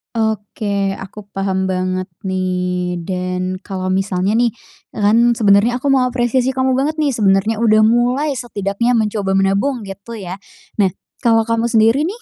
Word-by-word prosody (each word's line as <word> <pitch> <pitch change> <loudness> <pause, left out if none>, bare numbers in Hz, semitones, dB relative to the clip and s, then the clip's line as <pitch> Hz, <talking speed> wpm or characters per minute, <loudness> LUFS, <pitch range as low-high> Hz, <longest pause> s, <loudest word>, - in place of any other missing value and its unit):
Oke, 205 -2 -1
aku 195 +2 -8
paham 190 -1 -1
banget 185 0 -1 0.2
nih. 180 -1 -1
Dan 185 +1 -3
kalau 185 -2 -4
misalnya 190 +1 0
nih, 235 0 +3 0.4
e - - -13
kan 210 +2 +4
sebenernya 225 +2 +3
aku 280 - -3
mau 270 -2 +4
apresiasi 250 +1 +1
kamu 260 0 +1
banget 300 +4 -1
nih, 285 -5 +1
sebenernya 200 +1 +2
udah 215 -1 +5
mulai, 245 +6 +2
setidaknya 230 -1 -2
mencoba 210 -4 0
menabung 200 +5 +1
gitu 200 +4 -8
ya. 185 -1 -6 0.5
Nah, 190 - +2 0.3
kalau 225 -1 +3
kamu 230 0 0
sendiri 225 +6 +4
nih, 420 +8 -4
210 Hz, 150 wpm, -18 LUFS, 190-240 Hz, 0.5 s, udah